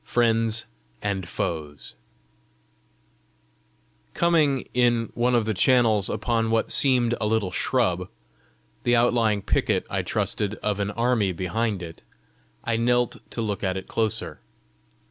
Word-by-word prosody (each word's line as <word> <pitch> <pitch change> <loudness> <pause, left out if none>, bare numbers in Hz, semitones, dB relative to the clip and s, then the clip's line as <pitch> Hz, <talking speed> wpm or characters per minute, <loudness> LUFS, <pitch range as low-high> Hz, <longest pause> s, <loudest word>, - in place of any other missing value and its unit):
FRIENDS 115 -2 +1 0.4
AND 95 -4 -2
FOES 75 -5 -4 2.2
Coming, 155 -6 +2
in 120 -2 +2
one 120 +1 +1
of 115 -2 +2
the 110 - 0
channels, 110 -1 +4
upon 115 -2 0
what 115 0 0
seemed 125 -4 +3
a 105 - +1
little 105 -4 0
shrub, 90 -5 0 0.7
the 120 - +2
outlying 115 -4 +2
picket, - - 0
I - - 0
trusted, 105 0 -2
of 105 -1 -1
an 100 0 -1
army 115 -3 +1
behind 100 +2 -2
it, 80 -1 -9 0.6
I 115 - 0
knelt 120 +1 +1
to 115 - -3
look 105 -2 -3
at 95 -1 0
it 95 - -7
closer. 110 -9 -2
110 Hz, 125 wpm, -24 LUFS, 100-120 Hz, 2.2 s, channels